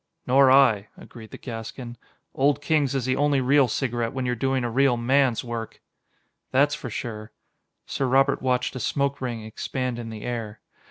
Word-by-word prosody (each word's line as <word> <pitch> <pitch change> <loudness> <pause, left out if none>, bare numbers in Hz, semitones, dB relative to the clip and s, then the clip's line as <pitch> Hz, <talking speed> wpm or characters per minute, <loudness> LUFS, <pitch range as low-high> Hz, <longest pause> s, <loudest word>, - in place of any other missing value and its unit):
"Nor 135 +1 +5
I," 120 -7 +5
agreed 110 -2 -12
the - - -10
Gascon. 120 0 -7 0.4
"Old 140 +2 +2
Kings 145 -2 +1
is 130 -3 -1
the 130 0 +1
only 145 -1 +2
real 135 +1 +4
cigarette 120 0 -2
when 130 -1 -3
you're 125 - 0
doing 130 +2 0
a 120 - -1
real 135 0 +3
man's 130 0 +2
work." 115 -2 -6 0.7
"That's 145 +3 +3
for 130 - -5
sure." 110 -1 -6 0.5
Sir 135 - -2
Robert 135 +2 +3
watched 125 0 0
a - - -4
smoke 140 +3 -1
ring 120 -4 -4
expand 125 +3 -4
in 115 -1 -6
the 110 -1 -8
air. 115 -4 -5
125 Hz, 175 wpm, -25 LUFS, 115-135 Hz, 0.7 s, Nor